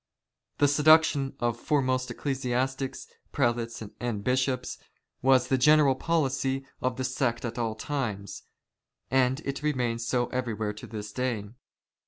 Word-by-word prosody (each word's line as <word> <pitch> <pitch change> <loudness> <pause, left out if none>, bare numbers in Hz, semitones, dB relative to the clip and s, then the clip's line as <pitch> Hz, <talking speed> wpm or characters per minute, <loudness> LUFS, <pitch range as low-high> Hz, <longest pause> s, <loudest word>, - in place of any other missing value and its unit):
The 145 - +4
seduction 150 -1 +4
of 120 -1 -1
foremost 130 -4 0
ecclesiastics, 130 +1 -2 0.3
prelates, 120 -3 -1 0.2
and 115 -4 -3
bishops, 130 +1 0 0.4
was 130 -1 +4
the 130 0 +1
general 150 0 +6
policy 135 -3 0 0.2
of 130 0 -1
the 130 - -2
sect 125 -2 -1
at 120 +1 -4
all 115 -2 -1
times, 110 -6 -4 0.7
and 130 +2 +2
it 140 -1 -4
remains 125 -6 -1
so 125 -1 +1
everywhere 110 -4 -2
to 105 - -10
this 105 -2 -6
day. 115 -6 -2
130 Hz, 130 wpm, -28 LUFS, 120-135 Hz, 0.7 s, general